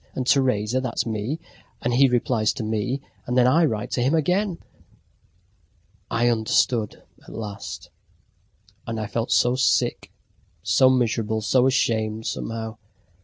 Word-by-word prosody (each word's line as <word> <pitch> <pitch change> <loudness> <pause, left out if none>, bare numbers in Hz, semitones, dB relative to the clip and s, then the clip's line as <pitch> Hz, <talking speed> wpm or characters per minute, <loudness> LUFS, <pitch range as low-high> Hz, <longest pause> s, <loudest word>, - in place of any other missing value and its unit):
And 130 - -2
Teresa 130 -3 +2
that's 125 -3 -2
me, 115 +7 -3 0.4
and 120 - 0
he 135 +3 +5
replies 120 -3 +1
to 125 - -5
me, 110 +5 -2 0.3
and 125 +1 -1
then 125 - +5
I 160 +7 +4
write 120 -2 -2
to 125 - 0
him 135 +6 +2
again..." 180 +4 +1 1.5
I 120 +1 +1
understood 115 -1 +1 0.2
at - - -16
last. 105 -3 -7 1.0
And 115 -1 -3
I 110 - -2
felt 115 +3 -3
so 125 +1 +3
sick, 130 - +1 0.5
so 130 - +4
miserable, 110 -3 0
so 125 +4 +3
ashamed, 110 -4 0
somehow. 115 -1 -4
120 Hz, 135 wpm, -23 LUFS, 110-130 Hz, 1.5 s, he